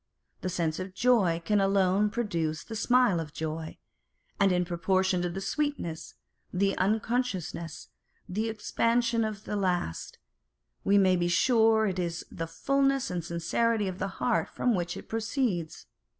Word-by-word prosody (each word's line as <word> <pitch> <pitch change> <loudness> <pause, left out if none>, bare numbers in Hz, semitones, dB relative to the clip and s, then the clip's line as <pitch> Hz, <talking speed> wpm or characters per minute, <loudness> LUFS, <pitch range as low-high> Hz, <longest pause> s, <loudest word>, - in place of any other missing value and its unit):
The 185 - -2
sense 165 -3 -1
of 185 0 -6
joy 190 -8 +3
can 210 +1 +3
alone 195 +1 +3
produce 170 -9 -2
the 225 - -7
smile 245 -5 +3
of 155 -2 -6
joy; 160 0 -5 0.6
and 200 -1 +4
in 180 0 +2
proportion 185 +1 +1
to 175 - -1
the 190 +3 -5
sweetness, 195 - -3 0.4
the 195 +1 +1
unconsciousness, 200 -5 -1 0.4
and 180 - -9
the 225 +1 0
expansion 230 +1 +1
of 215 -1 -4
the 210 - -4
last, 180 - -2 0.7
we 200 - +4
may 190 -2 +5
be 175 -1 +1
sure 220 +3 +4
is 175 -4 -2
the 165 - -4
fulness 275 - +1
and 175 -2 -2
sincerity 200 +6 0
of 185 0 -5
the - - -1
heart 240 -2 +1
from 245 - 0
which 175 -3 -2
it - - -10
proceeds. 220 - -2
195 Hz, 150 wpm, -28 LUFS, 175-225 Hz, 0.7 s, may